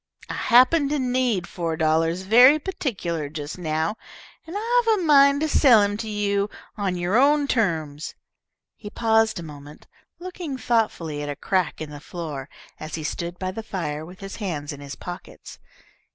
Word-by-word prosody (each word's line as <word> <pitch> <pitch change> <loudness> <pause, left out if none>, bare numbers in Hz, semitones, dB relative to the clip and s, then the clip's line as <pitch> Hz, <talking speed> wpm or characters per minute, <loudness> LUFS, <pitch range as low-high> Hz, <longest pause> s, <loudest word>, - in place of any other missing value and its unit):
I - - -3
happen 270 +5 +4
to 300 - 0
need 250 -7 0
four 165 -3 -4
dollars 165 +3 +1
very 245 +9 +7
particular 195 - -3
just 150 +2 -6
now, 160 +4 -1 0.5
and 335 - -8
I've 460 0 +2
a - - -2
mind 280 -2 +5
to 315 - +1
sell 250 -8 +6
him 205 0 0
to 220 0 -5
you 205 -1 0 0.3
on 195 -4 -2
your 180 +6 +1
own 290 +1 +4
terms." 160 - -1 0.6
He 210 - -9
paused 225 -2 +2
a - - -7
moment, 145 -1 -11 0.3
looking 350 -6 -6
thoughtfully 195 -12 -1
at 145 - -4
a 145 - -3
crack 185 +2 -1
in 155 -1 -6
the 145 - -8
floor, 150 -4 -7 0.3
as 155 0 -6
he 160 - -5
stood 170 +3 -4
by 185 0 -3
the 225 - -6
fire 160 -8 -4
with 180 +4 -12
his 195 0 -7
hands 155 -9 -4
in 145 - -10
his 140 -1 -8
pockets. 180 +1 -10
195 Hz, 175 wpm, -24 LUFS, 160-255 Hz, 0.6 s, very